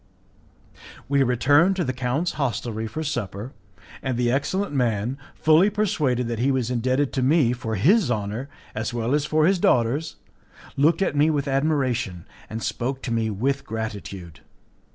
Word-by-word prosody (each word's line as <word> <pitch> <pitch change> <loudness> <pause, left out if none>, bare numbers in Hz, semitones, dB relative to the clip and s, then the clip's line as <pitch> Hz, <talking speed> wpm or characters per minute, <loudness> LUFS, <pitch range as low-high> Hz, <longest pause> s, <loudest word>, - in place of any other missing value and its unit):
We 140 +1 +2
returned 145 +9 +4
to 185 - 0
the 130 -4 -2
count's 130 +7 -1
hostelry 115 -4 -2
for 140 +9 -4
supper, 110 -4 -4 0.5
and 130 -3 -2
the 120 -1 +1
excellent 145 +7 -1
man, 120 0 0 0.2
fully 160 +6 +4
persuaded 150 - 0
that 115 -2 -3
he 130 +3 +2
was 130 -3 0
indebted 130 +3 0
to 135 - 0
me 130 -2 +3
for 115 -3 -4
his 170 - +3
honour 110 +4 -3 0.2
as 110 +2 -3
well 120 +2 -1
as 150 0 +1
for 155 0 +3
his 190 +1 +3
daughter's, 135 +4 +1 0.6
looked 160 +6 +3
at 150 - -1
me 150 +2 +4
with 145 -2 0
admiration, 135 - 0 0.2
and 110 +1 -5
spoke 130 +2 -3
to 120 - -3
me 115 -1 0
with 135 +7 -1
gratitude. 100 -6 -6
130 Hz, 160 wpm, -24 LUFS, 115-150 Hz, 0.6 s, returned